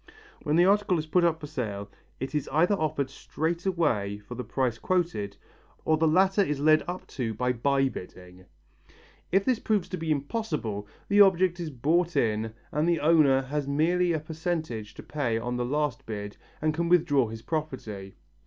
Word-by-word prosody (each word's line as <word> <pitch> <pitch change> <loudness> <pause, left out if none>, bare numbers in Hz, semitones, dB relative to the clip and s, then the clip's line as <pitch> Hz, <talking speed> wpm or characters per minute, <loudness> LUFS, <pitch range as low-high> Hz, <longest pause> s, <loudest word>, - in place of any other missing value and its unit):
When 150 -1 0
the 175 +2 +5
article 200 -2 +3
is 155 - -2
put 175 +3 +2
up 165 -2 +2
for 155 - -7
sale 110 -9 -4 0.3
it 135 +3 -4
is 150 -2 -2
either 165 +7 +3
offered 155 -7 -1
straight 165 +5 -3
away 120 - 0
for 105 +4 -10
the 125 +1 -5
price 125 -4 -1
quoted 170 - -1 0.5
or 160 - +4
the 160 +1 +2
latter 190 +5 +4
is 150 -7 0
led 155 +1 +4
up 180 +1 -5
to 115 -4 -3
by 125 +3 0
by 135 +3 +2
bidding. 90 -5 -10 0.9
If 195 +1 +3
this 255 -4 +2
proves 210 -5 0
to 185 - -3
be 165 -1 -4
impossible, 145 - -2 0.2
the 205 +1 +5
object 185 -2 +4
is 170 -2 -3
bought 165 +6 +1
in 110 -1 +1 0.2
and 155 +3 +1
the 170 - +2
owner 150 -4 +4
has 145 +1 -3
merely 170 +5 +2
a 165 - +1
slight 155 - -9
percentage 155 -10 -4
to - - -9
pay 130 -7 -1
on 120 +2 -3
the 120 - -1
last 145 -2 -1
bid 105 -2 -5 0.3
and 155 0 +2
can 170 +2 -1
withdraw 155 -8 +4
his 110 +1 -8
property. 120 -11 -4
150 Hz, 190 wpm, -27 LUFS, 120-170 Hz, 0.9 s, the